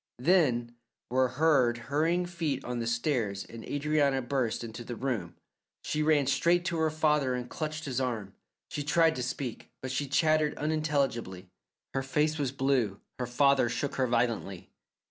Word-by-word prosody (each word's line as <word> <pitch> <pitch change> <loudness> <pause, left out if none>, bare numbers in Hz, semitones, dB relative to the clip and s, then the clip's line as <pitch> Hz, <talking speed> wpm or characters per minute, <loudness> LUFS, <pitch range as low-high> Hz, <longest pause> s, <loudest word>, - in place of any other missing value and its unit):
Then 125 -6 +2 0.3
were 130 +1 +3
heard 130 -3 +3
hurrying 160 +8 0
feet 160 -6 -3
on 125 0 -3
the 115 - -2
stairs 120 -5 -1
and 115 -1 -10
Adrianna 145 -2 +1
burst 125 -3 -1
into 115 +1 -7
the 120 +1 -6
room. 115 -10 -3 0.5
She 155 - -1
ran 150 -2 +3
straight 170 +6 +2
to 170 -2 -1
her 160 0 +2
father 150 -4 +1
and 125 -1 -4
clutched 155 +1 -4
his 135 -2 -1
arm; 110 -6 -3 0.3
she 145 - -4
tried 160 +2 +3
to - - -2
speak, 125 0 -4
but 130 - -5
she 140 +2 -1
chattered 155 +2 +2
unintelligibly; 140 - -1 0.4
her 135 - 0
face 150 +3 0
was 140 -3 0
blue. 130 -7 0 0.2
Her 125 - -2
father 135 0 +3
shook 120 +4 -3
her 130 -1 +2
violently. 115 -6 -1
135 Hz, 165 wpm, -29 LUFS, 120-150 Hz, 0.5 s, were